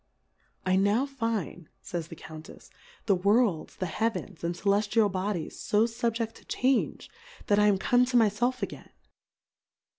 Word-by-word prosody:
I 185 0 +3
now 205 +7 +3
find, 225 - -3
fays 170 -2 -4
the 165 - -9
Count 155 0 -11
efs^ - - -14 0.3
the 205 - +4
Worlds, 200 -2 +2
the 185 - -3
Heavens, 200 -1 -3
and 170 +1 -1
Celeftial 205 +2 +2
Bodies 185 -2 -3
fo 210 +1 +4
fubjecl 230 0 -1
to - - -18
change, 260 +1 0 0.4
that 205 0 +3
I 210 - +5
am 200 -2 +4
come 245 +6 +3
to 250 0 +1
my 225 -3 +5
felf 245 +5 -1
again. - - -6
210 Hz, 155 wpm, -28 LUFS, 185-230 Hz, 0.4 s, I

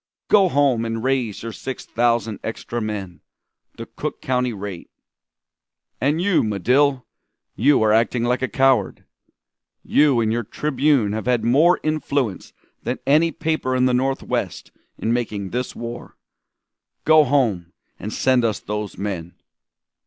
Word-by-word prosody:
"'Go 195 -3 +5
home 140 -6 +2
and 115 0 -3
raise 130 -6 -1
your 115 - -5
six 130 +4 -7
thousand 115 -3 0
extra 120 +1 -4
men 100 -6 -5 0.6
the - - -6
Cook - - -6
County 125 -1 0
rate. 100 -4 -7 1.1
And 145 +4 +1
you, 185 0 +2
Medill, 125 +6 +1 0.5
you 135 0 +3
are 105 -1 +3
acting 115 +2 +2
like 125 +1 0
a 130 - 0
coward! 130 -7 +1 0.8
You 145 -4 +3
and 110 -1 +1
your 120 - 0
Tribune 135 -1 +1
have 110 +2 -4
had 120 -3 +1
more 150 +10 +4
influence 140 -8 -2 0.3
than - - -3
any 155 +4 +4
paper 155 -6 -1
in 130 0 +3
the 130 - +2
Northwest 135 +2 -2 0.3
in 115 - -1
making 105 -5 -3
this 125 +1 -3
war. 120 0 -8 0.9
Go 155 0 +6
home 115 -11 0 0.3
and 105 - -5
send 130 0 +2
us 110 -3 0
those 105 0 -5
men!'" 90 -4 -5
120 Hz, 140 wpm, -21 LUFS, 110-135 Hz, 1.1 s, Go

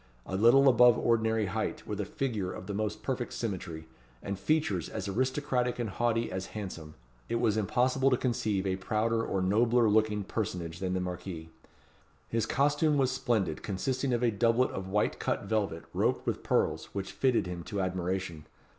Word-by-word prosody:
A 95 - -4
little 120 +7 +6
above 125 -2 +7
the - - -3
ordinary 110 -2 +2
height, 95 - -3
with 105 -1 -3
a - - -3
figure 105 -5 -2
of - - -8
the 100 - -4
most 105 +1 -3
perfect 125 -2 -3
symmetry, 85 -7 -4 0.4
and 100 -1 -4
features 155 +6 0
as 105 -3 -4
aristocratic 130 +3 0
and 120 -4 -2
haughty 115 +1 0
as 95 0 -4
handsome, 85 -7 -7 0.3
it - - 0
was 115 -3 +2
impossible 125 +5 +2
to 125 - +3
conceive 110 -6 -1
a 95 -1 0
prouder 115 +4 0
or 95 - -1
a - - 0
nobler 115 +4 +3
looking 105 -1 +2
personage 90 -5 -4
than 95 -1 -1
the - - 0
marquis. 90 -2 -5 0.8
His 115 -1 -1
costume 145 +2 +2
was 130 -2 +2
splendid, 110 - 0
consisting 130 +7 -2
of 120 0 +1
a 120 - +3
doublet 115 +4 +2
of 95 0 -5
white 105 +2 0
cut - - -1
velvet, 100 -7 -1
roped - - 0
with - - -1
pearls, - - +1
which 100 -1 -4
fitted 130 -6 +1
him 90 -1 -5
to 100 -3 -4
admiration. 90 -3 -2
110 Hz, 180 wpm, -30 LUFS, 95-120 Hz, 0.8 s, above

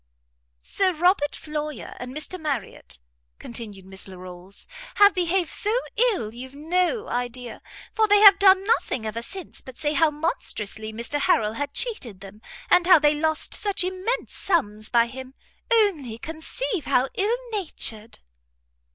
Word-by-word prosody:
"Sir 375 - 0
Robert 345 -2 +2
Floyer 300 -1 -5
and 250 0 -6
Mr 365 +4 -3
Marriot," 300 -3 -4 0.4
continued 210 -5 -7
Miss 190 +1 -6
Larolles, 185 0 -10 0.3
"have 405 0 +6
behaved 360 -1 0
so 430 +4 0 0.2
ill 415 - +1
you've 260 +3 -10
no 360 +8 0
idea, 245 0 -4 0.3
for 440 -1 +3
they 415 0 +6
have 400 -2 +9
done 385 -1 +6
nothing 260 - 0
ever 220 +2 -3
since 380 +8 -6
but 260 -2 -12
say 295 -1 -1
how 310 +2 +4
monstrously 220 - -3
Mr 235 +6 -3
Harrel 220 -6 +2
had 285 +4 -4
cheated 260 - -1
them, 200 +2 -12 0.3
and 355 -1 +4
how 365 -2 +9
they 295 -1 +3
lost 315 +1 -1
such 405 -2 0
immense 375 +6 -2
sums 215 - -1
by 235 -1 +4
him; 260 +2 -9 0.4
only 350 - +2
conceive 320 - -4
how 250 +2 +2
ill 425 +5 +1
natured!" 230 - -3
300 Hz, 145 wpm, -24 LUFS, 235-375 Hz, 0.4 s, have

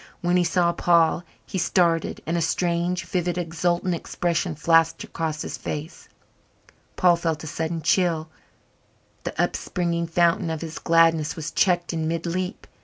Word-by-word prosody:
When 175 0 +1
he 180 - +4
saw 175 0 +2
Paul 170 -1 +3 0.2
he 190 - -3
started 170 -2 +1
and 165 - -1
a 170 - +1
strange, 175 +1 0
vivid, 175 -1 -1
exultant 175 +1 0
expression 170 0 -2
flashed 165 +1 +3
across 155 -2 -3
his - - -6
face. 155 +3 -6 0.9
Paul 180 -1 +5
felt 165 -2 -2
a - - -6
sudden 160 +1 -3
chill 165 -1 +2 1.0
the - - -5
upspringing 170 -1 -1
fountain 170 +1 +2
of 160 -1 -3
his 165 -1 -6
gladness 165 -2 +3
was 155 -2 -5
checked 175 -3 +1
in 160 -1 -1
mid 165 +1 -2
leap. 180 +3 -3
170 Hz, 150 wpm, -24 LUFS, 160-175 Hz, 1.0 s, Paul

